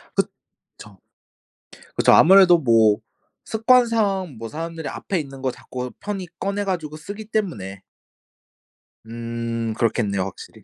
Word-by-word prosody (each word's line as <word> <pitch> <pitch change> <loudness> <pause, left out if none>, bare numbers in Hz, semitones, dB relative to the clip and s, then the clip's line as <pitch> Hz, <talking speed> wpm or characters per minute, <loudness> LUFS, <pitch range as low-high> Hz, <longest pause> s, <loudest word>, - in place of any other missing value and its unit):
그쵸. 100 -3 -6 1.0
그쵸. - - +4
아무래도 185 0 +7
뭐 115 -7 +4 0.5
습관상 220 - +2
뭐 115 0 -7
사람들이 165 0 -6
앞에 190 - -3
있는 135 -3 -8
거 130 -1 0
자꾸 125 0 -7
편히 200 -3 -5
꺼내 200 +1 -2
가지고 160 -6 -3
쓰기 205 +7 -8
때문에. 105 - -3 1.2
음 115 0 -4
그렇겠네요 105 -4 0
확실히. 95 - -10
150 Hz, 255 characters per minute, -22 LUFS, -, 1.2 s, 아무래도